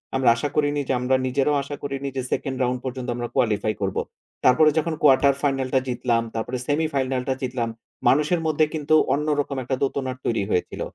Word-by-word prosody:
আমরা 130 Hz, -3 st, +4 dB
আশা 145 Hz, +5 st, -2 dB
করিনি 145 Hz, -1 st, +1 dB
যে -, -, +1 dB
আমরা 130 Hz, +1 st, +2 dB
নিজেরাও 140 Hz, +3 st, +1 dB
আশা 145 Hz, +1 st, -6 dB
করিনি 140 Hz, 0 st, -3 dB
যে -, -, 0 dB
সেকেন্ড 130 Hz, -1 st, -2 dB
রাউন্ড 125 Hz, 0 st, 0 dB
পর্যন্ত 130 Hz, 0 st, -4 dB
আমরা 120 Hz, 0 st, -3 dB
কোয়ালিফাই 110 Hz, -1 st, +1 dB
করব। 95 Hz, -1 st, -1 dB, 0.5 s
তারপরে 155 Hz, +5 st, +6 dB
যখন 160 Hz, +1 st, +1 dB
কোয়ার্টার 140 Hz, -1 st, +5 dB
ফাইনাল 135 Hz, -2 st, 0 dB
টা 130 Hz, -, +5 dB
জিতলাম, 120 Hz, -1 st, 0 dB
তারপরে 120 Hz, +3 st, -2 dB
সেমিফাইনাল 140 Hz, -4 st, 0 dB
টা -, -, +3 dB
জিতলাম 125 Hz, -3 st, -2 dB, 0.4 s
মানুষের 150 Hz, +5 st, +3 dB
মধ্যে 155 Hz, 0 st, +3 dB
কিন্তু 155 Hz, 0 st, +1 dB, 0.2 s
অন্যরকম 145 Hz, -1 st, 0 dB
একটা 130 Hz, +2 st, -1 dB
দোতনার 130 Hz, -2 st, -1 dB
তৈরি 115 Hz, -4 st, 0 dB
হয়েছিল 90 Hz, -, -1 dB
135 Hz, 180 wpm, -23 LUFS, 125-145 Hz, 0.5 s, তারপরে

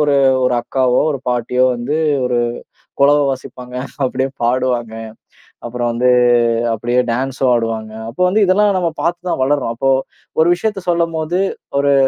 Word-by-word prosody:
ஒரு 145 Hz, -1 st, +3 dB, 0.3 s
ஒரு 125 Hz, -1 st, +2 dB
அக்காவோ, 130 Hz, 0 st, +1 dB
ஒரு 140 Hz, -, -5 dB
பாட்டியோ 125 Hz, +1 st, +1 dB
வந்து 125 Hz, +6 st, -2 dB, 0.3 s
ஒரு 125 Hz, -1 st, 0 dB, 0.6 s
குலவை 145 Hz, +1 st, +5 dB
வாசிப்பாங்க. 130 Hz, -1 st, -7 dB, 0.5 s
அப்படியே 130 Hz, +1 st, -1 dB
பாடுவாங்க. 120 Hz, -1 st, 0 dB, 0.7 s
அப்பறம் 120 Hz, 0 st, -2 dB
வந்து 125 Hz, +2 st, +2 dB, 0.6 s
அப்படியே 120 Hz, +3 st, 0 dB
டான்ஸும் 130 Hz, +2 st, -1 dB
ஆடுவாங்க. 115 Hz, -2 st, -2 dB, 0.2 s
அப்போ 120 Hz, +10 st, -6 dB
வந்து 210 Hz, +4 st, +2 dB
இதெல்லாம் 200 Hz, +2 st, +3 dB
நம்ம 175 Hz, -2 st, 0 dB
பார்த்து 175 Hz, +3 st, -2 dB
தான் -, -, -1 dB
வளர்றோம். 135 Hz, -3 st, 0 dB
அப்போ, 135 Hz, +3 st, +1 dB, 0.5 s
ஒரு 160 Hz, -, +5 dB
விஷயத்தை 205 Hz, +1 st, -3 dB
சொல்லும்போது 170 Hz, 0 st, 0 dB, 0.4 s
ஒரு 140 Hz, 0 st, +3 dB
130 Hz, 140 wpm, -17 LUFS, 120-160 Hz, 0.7 s, குலவை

